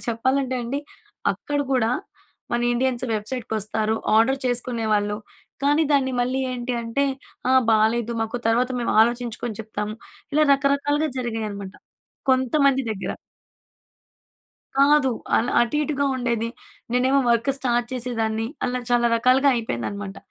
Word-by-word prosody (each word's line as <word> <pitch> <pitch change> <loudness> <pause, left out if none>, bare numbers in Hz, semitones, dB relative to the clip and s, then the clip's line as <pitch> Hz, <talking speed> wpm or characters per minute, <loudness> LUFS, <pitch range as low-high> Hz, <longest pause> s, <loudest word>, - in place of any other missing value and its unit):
చెప్పాలంటే 260 +3 0
అండి 275 +5 -2 0.5
అక్కడ 290 -1 -4
కూడా 235 -3 +2 0.6
మన 240 - +1
ఇండియన్స్ 255 0 0
వెబ్సైట్‌కి 220 +2 -4
వస్తారు. 215 +1 -1 0.2
ఆర్డర్ 265 +5 +4
చేసుకునేవాళ్ళు 225 -4 0 0.5
కానీ 290 +3 +4
దాన్ని 265 -2 +2
మళ్ళీ 255 +2 0
ఏంటి 250 0 -3
అంటే 230 +5 0 0.4
ఆహ్, 260 0 +5
బాలేదు 225 +2 +2
మాకు 225 +2 -3
తర్వాత 245 +3 +2
మేము 235 - 0
ఆలోచించుకొని 235 -2 -2
చెప్తాం. 210 -1 -4 0.4
ఇలా 305 0 +5
రకరకాలుగా 285 +2 +1
జరిగాయన్నామట. 215 -5 -4 0.6
కొంతమంది 265 +1 +3
దగ్గర. 195 - -4 1.6
కాదు. 280 -1 +5 0.3
అలా 240 +2 +1
అటు 240 +5 +1
ఇటుగా 280 -1 0
ఉండేది. 235 -2 -1 0.4
నేనేమో 260 +2 +3
వర్క్ 235 +4 +2
స్టార్ట్ 240 -2 0
చేసేదాన్ని. 225 -3 -1 0.2
అలా 250 0 -1
చాలా 240 0 +4
రకాలుగా 255 +4 +4
అయిపోయిందనమాట. 200 - -4
245 Hz, 120 wpm, -23 LUFS, 225-265 Hz, 1.6 s, ఆహ్